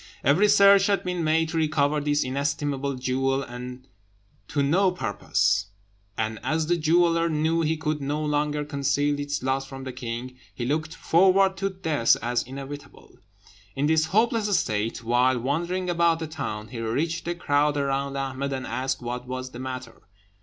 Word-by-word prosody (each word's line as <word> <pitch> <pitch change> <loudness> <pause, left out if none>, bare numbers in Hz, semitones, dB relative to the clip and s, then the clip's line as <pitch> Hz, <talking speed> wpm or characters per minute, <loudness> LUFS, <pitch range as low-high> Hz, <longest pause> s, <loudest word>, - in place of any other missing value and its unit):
Every 160 +10 +4
search 200 -1 +6
had 200 -1 +1
been 180 -2 -2
made 160 +1 +2
to 165 - -3
recover 150 -2 +1
this 145 0 +1
inestimable 140 +1 -2
jewel, 135 +1 0
but 125 +1 -8 0.7
to 145 -2 0
no 185 +7 +3
purpose; 100 - 0 0.5
and 110 0 -2
as 160 0 0
the 175 +2 +2
jeweller 170 +1 +3
knew 160 +1 +1
he 160 0 0
could 155 -1 -2
no 145 +2 -2
longer 150 0 0
conceal 145 0 0
its 145 -2 -3
loss 135 +1 -1
from 135 0 -8
the 130 -1 -6
king, 120 +1 -6 0.2
he 120 - -3
looked 155 +4 -2
forward 190 +2 +4
to 195 0 -1
death 160 -10 +2
as 120 +1 0
inevitable. 140 +2 -10 0.6
In 140 - 0
this 160 +1 +3
hopeless 215 0 +2
state, 110 -2 -2
while 125 +2 +3
wandering 170 +8 -1
about 170 -1 +2
the 165 - -4
town, 120 -9 -5
he 120 - -7
reached 150 +10 -2
the 175 +1 -2
crowd 145 -2 +1
around 140 0 -1
Ahmed 135 0 -3
and 130 -1 -4
asked 130 0 -2
what 125 +1 -5
was 130 0 -5
the 120 - -9
matter. 130 -2 -7
145 Hz, 165 wpm, -25 LUFS, 130-165 Hz, 0.7 s, search